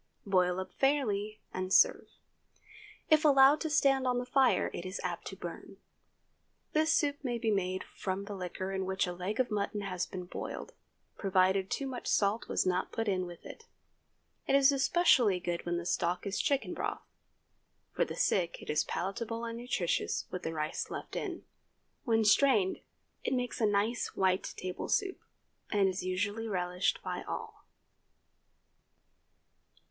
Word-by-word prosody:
Boil 180 Hz, -2 st, +2 dB
up 190 Hz, -, -6 dB
fairly, 215 Hz, -7 st, 0 dB
and 185 Hz, 0 st, -3 dB
serve. -, -, +5 dB, 1.0 s
If 310 Hz, 0 st, +6 dB
allowed 280 Hz, 0 st, +6 dB
to 320 Hz, -, -1 dB
stand 270 Hz, -3 st, +3 dB
on 250 Hz, -1 st, +2 dB
the 245 Hz, -, -2 dB
fire, 250 Hz, -5 st, +3 dB
it -, -, -5 dB
is 185 Hz, +2 st, -5 dB
apt -, -, -4 dB
to -, -, -6 dB
burn. -, -, -8 dB, 1.0 s
This 315 Hz, +1 st, +3 dB
soup 290 Hz, -3 st, +2 dB
may 240 Hz, -3 st, -1 dB
be 225 Hz, -1 st, 0 dB
made 185 Hz, -2 st, -1 dB
from 195 Hz, +1 st, -4 dB
the 205 Hz, -, -6 dB
liquor 185 Hz, 0 st, -4 dB
in 190 Hz, -1 st, -2 dB
which 190 Hz, 0 st, 0 dB
a 180 Hz, -, -4 dB
leg 185 Hz, +6 st, -4 dB
of 250 Hz, -3 st, +1 dB
mutton 205 Hz, 0 st, -1 dB
has 185 Hz, -2 st, -3 dB
been 180 Hz, -1 st, -6 dB
boiled, -, -, -6 dB, 0.5 s
provided 190 Hz, 0 st, +2 dB
too 275 Hz, -, -2 dB
much 260 Hz, -2 st, -5 dB
salt 205 Hz, +2 st, +1 dB
was -, -, 0 dB
not 185 Hz, 0 st, 0 dB
put 225 Hz, -1 st, -2 dB
in 185 Hz, -2 st, 0 dB
with 175 Hz, -1 st, -11 dB
it. 450 Hz, -, -11 dB, 0.8 s
It -, -, +3 dB
is 275 Hz, 0 st, +6 dB
especially 270 Hz, -, +4 dB
good 175 Hz, -1 st, -3 dB
when 175 Hz, 0 st, 0 dB
the 170 Hz, -, -4 dB
stock 175 Hz, +1 st, 0 dB
is 200 Hz, 0 st, -2 dB
chicken 280 Hz, -1 st, 0 dB
broth. -, -, -4 dB, 0.9 s
For -, -, +1 dB
the -, -, -5 dB
sick 170 Hz, -3 st, +1 dB
it -, -, -5 dB
is 150 Hz, -, +2 dB
palatable 230 Hz, +5 st, -3 dB
and 230 Hz, 0 st, -4 dB
nutritious 225 Hz, -8 st, -1 dB
with 180 Hz, -, -4 dB
the 160 Hz, -, -3 dB
rice 155 Hz, 0 st, -2 dB
left -, -, -6 dB
in. -, -, -4 dB, 0.6 s
When 225 Hz, -3 st, +2 dB
strained 215 Hz, -4 st, +4 dB, 0.4 s
it -, -, 0 dB
makes 250 Hz, -1 st, -2 dB
a 215 Hz, -, +4 dB
nice 205 Hz, +4 st, 0 dB
white 190 Hz, -1 st, +1 dB
table 185 Hz, 0 st, -5 dB
soup, 390 Hz, -2 st, 0 dB, 0.5 s
and 200 Hz, -2 st, +3 dB
is 185 Hz, 0 st, -2 dB
usually 205 Hz, +5 st, -2 dB
relished 180 Hz, -2 st, -1 dB
by -, -, -3 dB
all. -, -, -7 dB
200 Hz, 165 wpm, -31 LUFS, 185-250 Hz, 1.0 s, If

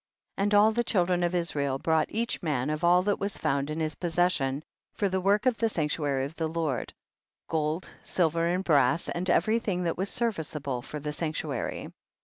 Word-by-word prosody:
33. 195 Hz, -, +1 dB
And 205 Hz, +1 st, +1 dB
all 210 Hz, +2 st, +6 dB
the 240 Hz, +2 st, 0 dB
children 180 Hz, -5 st, +1 dB
of 175 Hz, +1 st, +1 dB
Israel 145 Hz, -6 st, 0 dB
brought 160 Hz, +2 st, +1 dB
each 230 Hz, +1 st, -2 dB
man 150 Hz, -4 st, 0 dB
of 155 Hz, +2 st, -3 dB
all 175 Hz, +1 st, +5 dB
that 205 Hz, +1 st, 0 dB
was 200 Hz, 0 st, -2 dB
found 140 Hz, -2 st, 0 dB
in 155 Hz, +1 st, -3 dB
his 155 Hz, -1 st, -1 dB
possession 165 Hz, -5 st, 0 dB, 0.3 s
for 205 Hz, -, +1 dB
the 190 Hz, 0 st, 0 dB
work 200 Hz, +4 st, +2 dB
of 250 Hz, -3 st, +3 dB
the 225 Hz, -, +1 dB
sanctuary 150 Hz, -6 st, 0 dB
of 140 Hz, -, -7 dB
the 160 Hz, -, 0 dB
Lord, 155 Hz, -6 st, -2 dB, 0.6 s
gold, 160 Hz, +2 st, -1 dB
silver 165 Hz, -1 st, +1 dB
and 180 Hz, +2 st, 0 dB
brass, 145 Hz, -2 st, +3 dB
and 180 Hz, +1 st, -2 dB
every 215 Hz, +7 st, +3 dB
thing 185 Hz, -5 st, -2 dB
that 170 Hz, 0 st, -1 dB
was 195 Hz, +1 st, 0 dB
serviceable 155 Hz, -, -2 dB
for 150 Hz, +4 st, -7 dB
the 150 Hz, +1 st, -4 dB
sanctuary. 155 Hz, -5 st, -3 dB
165 Hz, 195 wpm, -28 LUFS, 150-185 Hz, 0.6 s, all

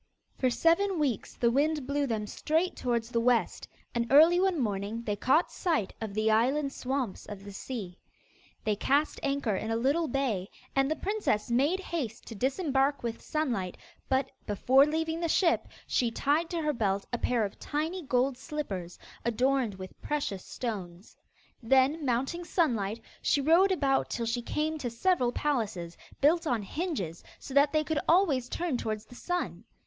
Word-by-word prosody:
For 255 Hz, -, +1 dB
seven 335 Hz, +8 st, +2 dB
weeks 275 Hz, -9 st, -1 dB
the 235 Hz, -1 st, +2 dB
wind 295 Hz, +2 st, +1 dB
blew 280 Hz, +1 st, 0 dB
them 220 Hz, -3 st, -1 dB
straight 320 Hz, -, 0 dB
towards 235 Hz, -2 st, -1 dB
the 235 Hz, -, +1 dB
west, 240 Hz, 0 st, +1 dB, 0.3 s
and 235 Hz, -1 st, 0 dB
early 325 Hz, +5 st, +7 dB
one 375 Hz, -3 st, +2 dB
morning 210 Hz, 0 st, -2 dB
they 210 Hz, -3 st, -1 dB
caught 265 Hz, -, +2 dB
sight 320 Hz, -, -1 dB
of 215 Hz, -3 st, -5 dB
the 215 Hz, 0 st, +2 dB
island 270 Hz, +6 st, +2 dB
swamps 260 Hz, -5 st, -3 dB
of 200 Hz, -2 st, -8 dB
the 200 Hz, -, -9 dB
sea. 195 Hz, -6 st, -6 dB, 0.6 s
They 215 Hz, -1 st, +1 dB
cast 285 Hz, +8 st, +1 dB
anchor 275 Hz, -7 st, 0 dB
in 220 Hz, +3 st, -3 dB
a 225 Hz, -, +1 dB
little 280 Hz, +8 st, +1 dB
bay, 235 Hz, -8 st, -1 dB, 0.3 s
and 270 Hz, 0 st, +3 dB
the 315 Hz, -, +1 dB
princess 395 Hz, -, -1 dB
made 285 Hz, +10 st, +2 dB
haste 285 Hz, -, -4 dB
to -, -, -8 dB
disembark 270 Hz, -, 0 dB
with 230 Hz, -1 st, -3 dB
Sunlight, 235 Hz, -, -2 dB, 0.3 s
but, 265 Hz, 0 st, +1 dB, 0.2 s
before 260 Hz, +7 st, +4 dB
leaving 320 Hz, +1 st, -1 dB
the 335 Hz, -1 st, -1 dB
ship, 335 Hz, 0 st, +2 dB, 0.2 s
she 240 Hz, -, +1 dB
tied 290 Hz, +8 st, +1 dB
to 335 Hz, -3 st, -2 dB
her 300 Hz, 0 st, +1 dB
belt 200 Hz, -5 st, 0 dB
a 240 Hz, -, 0 dB
pair 235 Hz, -3 st, +1 dB
of 200 Hz, -, -8 dB
tiny 320 Hz, +5 st, -2 dB
gold 260 Hz, -2 st, 0 dB
slippers, 200 Hz, -, -5 dB, 0.3 s
adorned 245 Hz, -1 st, +1 dB
with 185 Hz, 0 st, -10 dB
precious 280 Hz, -11 st, -2 dB
stones. 195 Hz, -6 st, -6 dB, 0.5 s
Then 270 Hz, +6 st, +3 dB
mounting 270 Hz, +7 st, -1 dB
Sunlight, 235 Hz, -, 0 dB, 0.2 s
she -, -, +2 dB
rode 335 Hz, +7 st, +5 dB
about 275 Hz, -7 st, +1 dB
till 235 Hz, -, -2 dB
she 235 Hz, +2 st, -1 dB
came 310 Hz, +5 st, -2 dB
to 250 Hz, -, -2 dB
several 245 Hz, +1 st, +1 dB
palaces, 215 Hz, -, -2 dB, 0.3 s
built 325 Hz, +4 st, +4 dB
on 235 Hz, -6 st, 0 dB
hinges, 200 Hz, -, -3 dB
so 270 Hz, -, -9 dB
that 285 Hz, +1 st, +5 dB
they 310 Hz, -1 st, +2 dB
could 310 Hz, -1 st, -1 dB
always 310 Hz, -9 st, +3 dB
turn 335 Hz, -7 st, -1 dB
towards 215 Hz, -2 st, -3 dB
the -, -, -15 dB
sun. 355 Hz, +8 st, -3 dB
265 Hz, 170 wpm, -29 LUFS, 225-310 Hz, 0.6 s, early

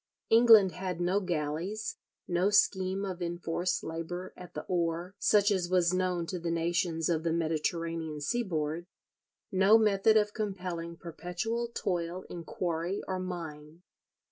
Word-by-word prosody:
England 225 Hz, -4 st, +8 dB
had 180 Hz, -2 st, -4 dB
no 180 Hz, +3 st, +2 dB
galleys, 180 Hz, -, -3 dB, 0.3 s
no 180 Hz, +3 st, +2 dB
scheme 195 Hz, -1 st, +2 dB
of 185 Hz, -2 st, -5 dB
enforced 175 Hz, +1 st, -2 dB
labour 165 Hz, +3 st, -5 dB
at 180 Hz, -1 st, -12 dB
the -, -, -4 dB
oar, 170 Hz, +1 st, -1 dB
such 205 Hz, 0 st, +4 dB
as 185 Hz, -3 st, 0 dB
was 180 Hz, -1 st, +3 dB
known 180 Hz, -2 st, 0 dB
to 180 Hz, +1 st, -4 dB
the 170 Hz, 0 st, -3 dB
nations 165 Hz, -1 st, 0 dB
of 165 Hz, -2 st, +1 dB
the 165 Hz, 0 st, 0 dB
Mediterranean 165 Hz, -1 st, -1 dB
seaboard, 165 Hz, -2 st, -2 dB, 0.6 s
no 195 Hz, +3 st, +6 dB
method 215 Hz, 0 st, +4 dB
of 210 Hz, -1 st, +2 dB
compelling 180 Hz, -5 st, -4 dB
perpetual 180 Hz, +9 st, -3 dB
toil 180 Hz, -5 st, -3 dB
in 170 Hz, -1 st, -6 dB
quarry 170 Hz, +3 st, -2 dB
or 185 Hz, -1 st, -2 dB
mine. 165 Hz, -3 st, -7 dB
175 Hz, 140 wpm, -30 LUFS, 165-195 Hz, 0.6 s, England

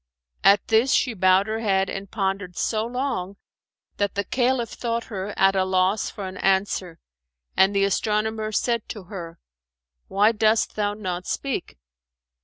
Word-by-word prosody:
At 200 Hz, +1 st, +5 dB
this 225 Hz, +4 st, +4 dB
she 250 Hz, -, +2 dB
bowed 185 Hz, -1 st, +4 dB
her 220 Hz, +1 st, -3 dB
head 195 Hz, -3 st, +1 dB
and 195 Hz, 0 st, -6 dB
pondered 195 Hz, -3 st, -2 dB
so 220 Hz, 0 st, 0 dB
long, 240 Hz, -7 st, -3 dB, 0.6 s
that 200 Hz, -1 st, -1 dB
the 200 Hz, -, 0 dB
Caliph 245 Hz, 0 st, 0 dB
thought 235 Hz, -1 st, -2 dB
her 195 Hz, +1 st, -3 dB
at 195 Hz, 0 st, +4 dB
a 190 Hz, -, +3 dB
loss 185 Hz, +2 st, +1 dB
for 200 Hz, -, -7 dB
an 185 Hz, -, -8 dB
answer 190 Hz, -3 st, 0 dB, 0.6 s
and 195 Hz, +1 st, +4 dB
the 195 Hz, -, +3 dB
astronomer 215 Hz, +2 st, 0 dB
said 235 Hz, +1 st, -1 dB
to 210 Hz, -, -7 dB
her, 170 Hz, -4 st, -8 dB, 0.7 s
"Why 205 Hz, +3 st, +3 dB
dost 220 Hz, 0 st, +2 dB
thou 205 Hz, -1 st, -1 dB
not 185 Hz, -4 st, -4 dB
speak?" 270 Hz, -, -3 dB
200 Hz, 155 wpm, -24 LUFS, 190-220 Hz, 0.7 s, At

